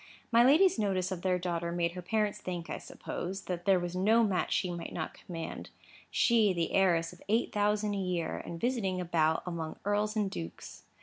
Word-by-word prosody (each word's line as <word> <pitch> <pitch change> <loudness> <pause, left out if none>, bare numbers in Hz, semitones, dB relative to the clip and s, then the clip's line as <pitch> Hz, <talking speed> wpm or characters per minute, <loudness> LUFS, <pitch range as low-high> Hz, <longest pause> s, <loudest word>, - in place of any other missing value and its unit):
My 235 0 +6
lady's 310 +3 +5
notice 190 -3 0
of 180 -2 -3
their 185 -1 +2
daughter 170 -1 -2
made 170 -1 0
her 180 +1 -7
parents 210 +3 0
think, 175 -2 -5
I - - -3
suppose, 190 +2 -5
that 175 -1 -4
there 195 -2 +5
was 175 0 -4
no 220 +5 +4
match 195 -4 +1
that - - -11
she 180 - 0
might 170 -1 -6
not 160 - -4
command; 165 -2 -7 0.4
she, 225 -5 +3
the 170 -2 -1
heiress 170 -4 +3
of - - -17
eight 225 +3 +2
thousand 210 0 +1
a - - -2
year, 180 -3 -1
and 170 - -7
visiting 220 -6 0
about 160 -3 +1
among 165 -3 -4
earls 210 +1 +1
and 205 -3 0
dukes. 85 0 -8
185 Hz, 200 wpm, -31 LUFS, 170-210 Hz, 0.4 s, My